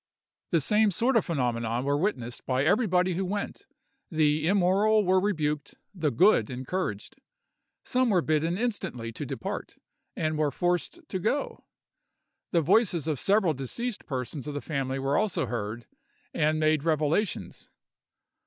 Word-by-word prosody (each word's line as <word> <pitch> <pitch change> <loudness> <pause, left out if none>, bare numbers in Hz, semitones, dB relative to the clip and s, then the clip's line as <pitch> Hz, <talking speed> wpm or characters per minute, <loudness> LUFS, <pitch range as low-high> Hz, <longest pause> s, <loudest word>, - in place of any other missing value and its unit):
The 165 -3 +2
same 210 +8 +3
sort 235 +8 +1
of 225 - +3
phenomena 120 -6 -1
were 140 +1 +1
witnessed 145 - -2
by 130 +1 +1
everybody 185 - +2
who 185 +3 -1
went—the 160 -5 -2
immoral 200 +3 +3
were 185 +1 +4
rebuked, 150 -7 -1 0.2
the 165 -6 0
good 135 - +4
encouraged. 130 - -4 0.7
Some 255 -1 +2
were 180 -5 +3
bidden 160 +3 +1
instantly 200 - -3
to - - -6
depart, - - -5 0.4
and 155 -1 -1
were 150 -1 +2
forced 175 - -1
to 190 - -3
go. 225 +10 -2 0.9
The 170 - +3
voices 180 - +2
of 150 -5 -1
several 195 -5 +3
deceased 205 - -4
persons 130 +1 -4
of 145 - -4
the - - -1
family 135 -3 -2
were 135 +1 +1
also 215 -9 0
heard, 115 -1 -4 0.5
and 155 +1 +1
made 155 -1 +2
revelations. 160 +5 -1
160 Hz, 140 wpm, -27 LUFS, 140-200 Hz, 0.9 s, were